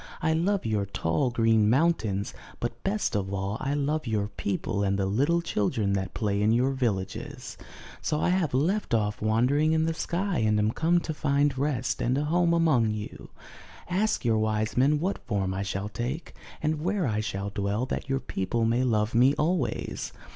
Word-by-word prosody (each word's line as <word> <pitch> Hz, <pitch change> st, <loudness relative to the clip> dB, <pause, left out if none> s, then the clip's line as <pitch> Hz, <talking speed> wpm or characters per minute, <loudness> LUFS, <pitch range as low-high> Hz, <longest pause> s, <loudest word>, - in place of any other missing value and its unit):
I 160 Hz, -, +1 dB
love 185 Hz, +3 st, +1 dB
your 105 Hz, -3 st, 0 dB
tall, 100 Hz, -, 0 dB
green 115 Hz, -2 st, +3 dB
mountains, 115 Hz, -, +1 dB, 0.3 s
but 120 Hz, 0 st, -4 dB
best 200 Hz, -, 0 dB
of 95 Hz, -2 st, -1 dB
all, 100 Hz, +2 st, -2 dB
I 140 Hz, +2 st, -1 dB
love 145 Hz, 0 st, -1 dB
your 105 Hz, -2 st, 0 dB
people 100 Hz, 0 st, -2 dB
and 100 Hz, 0 st, +1 dB
the 100 Hz, -, 0 dB
little 145 Hz, -, +1 dB
children 105 Hz, -6 st, 0 dB
that 95 Hz, -1 st, -2 dB
play 100 Hz, -2 st, 0 dB
in 105 Hz, +1 st, +3 dB
your 125 Hz, +4 st, +3 dB
villages. 105 Hz, -8 st, -3 dB, 0.5 s
So 150 Hz, -, -1 dB
I -, -, +1 dB
have 180 Hz, -5 st, +1 dB
left 155 Hz, -, +1 dB
off 105 Hz, -1 st, -1 dB
wandering 125 Hz, +9 st, +2 dB
in 160 Hz, 0 st, +2 dB
the 165 Hz, -, 0 dB
sky, 180 Hz, +2 st, -1 dB
and 110 Hz, -1 st, +2 dB
am 105 Hz, +1 st, +2 dB
come 170 Hz, +6 st, +2 dB
to 160 Hz, -, -4 dB
find 145 Hz, -1 st, +1 dB
rest 130 Hz, -2 st, -1 dB
and 125 Hz, +2 st, +1 dB
a 145 Hz, -, 0 dB
home 170 Hz, +2 st, +2 dB
among 155 Hz, -10 st, +3 dB
you. 105 Hz, -1 st, -6 dB, 0.6 s
Ask 190 Hz, -, 0 dB
your 110 Hz, -2 st, +3 dB
wise 110 Hz, 0 st, 0 dB
men 140 Hz, +4 st, +3 dB
what 185 Hz, +5 st, -2 dB
form 95 Hz, -4 st, -1 dB
I 95 Hz, -, -2 dB
shall 100 Hz, +1 st, -3 dB
take, 125 Hz, +9 st, -4 dB, 0.3 s
and 155 Hz, 0 st, 0 dB
where 185 Hz, +1 st, 0 dB
I 110 Hz, -4 st, 0 dB
shall 100 Hz, -1 st, -3 dB
dwell, 100 Hz, +3 st, -1 dB
that 135 Hz, -, -4 dB
your 135 Hz, 0 st, +1 dB
people 115 Hz, +4 st, -1 dB
may 120 Hz, +3 st, +2 dB
love 110 Hz, -3 st, +1 dB
me 130 Hz, +5 st, +5 dB
always." 165 Hz, 0 st, -1 dB
120 Hz, 190 wpm, -27 LUFS, 105-155 Hz, 0.6 s, me